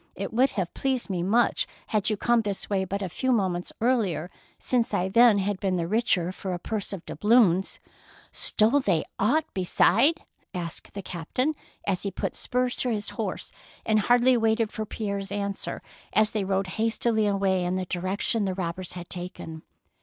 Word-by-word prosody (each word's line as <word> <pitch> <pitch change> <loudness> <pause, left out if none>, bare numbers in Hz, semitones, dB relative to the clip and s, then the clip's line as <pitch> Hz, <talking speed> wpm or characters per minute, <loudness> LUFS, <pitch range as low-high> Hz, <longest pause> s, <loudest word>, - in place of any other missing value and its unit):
" - - -38
It - - -7
would 255 +4 +4
have 180 -3 -1
pleased 260 -6 -1
me 180 -2 -1
much 220 +7 +2 0.2
had 215 -2 +1
you 215 - 0
come 240 +2 +3
this 205 -1 -4
way 190 -1 +1
but 200 +2 -3
a - - -1
few 260 +9 -1
moments 185 -6 0
earlier, 200 - +1 0.3
since 235 -4 0
I 190 -1 0
then 230 +1 +6
had 200 0 -1
been 190 -1 0
the 170 -2 0
richer 185 -4 +1
for 190 -1 -4
a - - -3
purse 205 +3 -3
of 190 -4 -6
doubloons." 210 -5 +3 0.5
"Stole 225 +7 +2
they 190 - +1 0.2
aught 290 +10 +3
beside? 230 - +3 0.2
" - - -41
asked 170 +1 -5
the 200 - -5
captain, 220 - -2 0.3
as 190 -2 0
he 200 - -1
put 190 - -4
spurs 250 0 -1
to 250 - 0
his 210 -2 -2
horse - - -4 0.3
and 215 -1 +3
hardly 245 +4 +4
waited 225 -1 +2
for 215 -1 -4
Pierre's 200 -2 -4
answer 200 -1 -3 0.3
as 215 0 +4
they 210 -2 -1
rode 195 0 0 0.2
hastily 225 -1 +1
away 195 -2 +1
in 180 +1 -1
the 185 0 -2
direc 185 +3 -3
tion 225 -3 +1
the 190 -1 -1
robbers 180 0 -4
had 175 -1 -7
taken. 175 -3 -6
200 Hz, 190 wpm, -26 LUFS, 185-230 Hz, 0.5 s, then